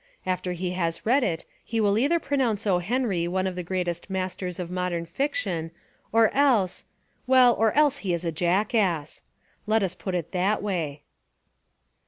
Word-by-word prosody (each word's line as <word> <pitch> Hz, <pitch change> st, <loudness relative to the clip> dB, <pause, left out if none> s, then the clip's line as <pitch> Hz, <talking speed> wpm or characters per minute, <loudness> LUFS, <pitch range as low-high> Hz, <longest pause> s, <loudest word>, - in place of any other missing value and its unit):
After 185 Hz, -1 st, -1 dB
he 180 Hz, +1 st, -3 dB
has 170 Hz, -2 st, -2 dB
read 255 Hz, +6 st, +4 dB
it 165 Hz, -7 st, -2 dB, 0.2 s
he 230 Hz, -, -2 dB
will 205 Hz, -2 st, +3 dB
either 285 Hz, +10 st, +2 dB
pronounce 255 Hz, -9 st, 0 dB
O. 185 Hz, -4 st, +3 dB
Henry 195 Hz, -3 st, 0 dB
one 185 Hz, +2 st, -1 dB
of 185 Hz, -1 st, -2 dB
the 180 Hz, -, -3 dB
greatest 175 Hz, 0 st, -3 dB
masters 185 Hz, -1 st, -3 dB
of 175 Hz, -1 st, -5 dB
modern 180 Hz, -2 st, -2 dB
fiction 180 Hz, -, -2 dB, 0.4 s
or 225 Hz, 0 st, +4 dB
else, 245 Hz, -10 st, +2 dB, 0.2 s
— -, -, -42 dB
well, 255 Hz, -2 st, +6 dB
or 225 Hz, -1 st, +2 dB
else 290 Hz, -1 st, +4 dB
he 200 Hz, -9 st, -3 dB
is 170 Hz, 0 st, -2 dB
a 165 Hz, -, 0 dB
jackass. 175 Hz, -1 st, 0 dB, 0.5 s
Let 215 Hz, 0 st, +3 dB
us 185 Hz, -2 st, -1 dB
put 185 Hz, 0 st, -4 dB
it 170 Hz, -3 st, -3 dB
that 195 Hz, +4 st, 0 dB
way. 160 Hz, -8 st, -3 dB
185 Hz, 175 wpm, -26 LUFS, 175-225 Hz, 0.5 s, well